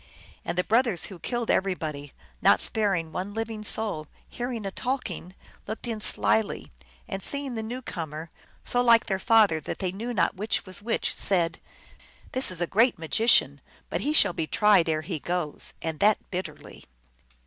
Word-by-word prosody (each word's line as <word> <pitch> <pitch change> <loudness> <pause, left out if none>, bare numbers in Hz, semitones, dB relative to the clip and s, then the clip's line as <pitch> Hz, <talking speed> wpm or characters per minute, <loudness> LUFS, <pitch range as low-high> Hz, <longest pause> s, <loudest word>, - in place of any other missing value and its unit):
And - - -4
the 180 - +3
brothers, 225 -5 +2
who 180 - -11
killed 240 +5 -1
everybody, 155 -7 -2 0.3
not - - +5
sparing 195 -7 +1
one 195 +5 -5
living 225 -1 -4
soul, 205 -8 -2 0.2
hearing 240 -3 -5
a 195 - -3
talk 250 0 -2
ing, 180 +2 -8 0.3
looked 220 +4 -5
in 225 -2 -3
slyly, 215 0 +1 0.4
and 195 -3 -4
seeing 280 +3 +1
the 225 - -3
new 245 +4 -6
comer, 160 -3 -6 0.3
so 245 - +2
like 235 -2 +5
their 190 -3 -1
father 210 -6 +4
that 150 - -5
they 185 -2 -2
knew 225 +6 -5
not 240 - +1
which 210 +4 -2
was 185 0 -4
which, 225 +2 -1
said, 170 -4 +2 0.4
" - - -25
This 260 -2 +3
is 180 -2 0
a - - +2
great 225 +7 +3
magician. 220 +9 +3 0.3
But - - -1
he 295 - 0
shall 305 - +4
be 160 - -3
tried 200 -5 +4
ere 155 -1 +1
he 165 -2 -4
goes, 175 -2 -2
and 160 -2 -3
that 210 0 +5
bitterly." 185 0 -7
200 Hz, 180 wpm, -26 LUFS, 170-230 Hz, 0.4 s, not